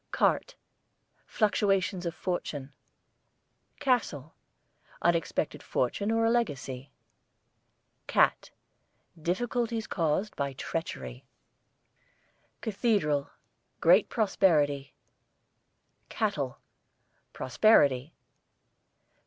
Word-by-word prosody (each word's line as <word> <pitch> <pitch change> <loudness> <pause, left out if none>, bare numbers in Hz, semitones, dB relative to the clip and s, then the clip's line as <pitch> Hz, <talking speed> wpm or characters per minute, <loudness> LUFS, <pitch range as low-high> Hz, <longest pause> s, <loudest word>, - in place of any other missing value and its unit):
CART, - - +1 0.7
fluctuations 195 -4 +1
of 170 - -4
fortune. 145 -6 -4 1.1
CASTLE, 165 - 0 0.7
unexpected 170 -2 0
fortune 200 - -1
or 225 0 +2
a 225 - +3
legacy. 140 - -2 1.2
CAT, - - +3 0.7
difficulties 230 +5 -1
caused 175 +4 -1
by 140 -1 -2
treachery. 65 - -5 1.3
CATHEDRAL, 195 - +1 0.5
great 180 +5 +5
prosperity. 150 - +2 1.1
CATTLE, 150 - -1 0.7
prosperity. 140 - +3
170 Hz, 60 wpm, -29 LUFS, 140-215 Hz, 1.3 s, great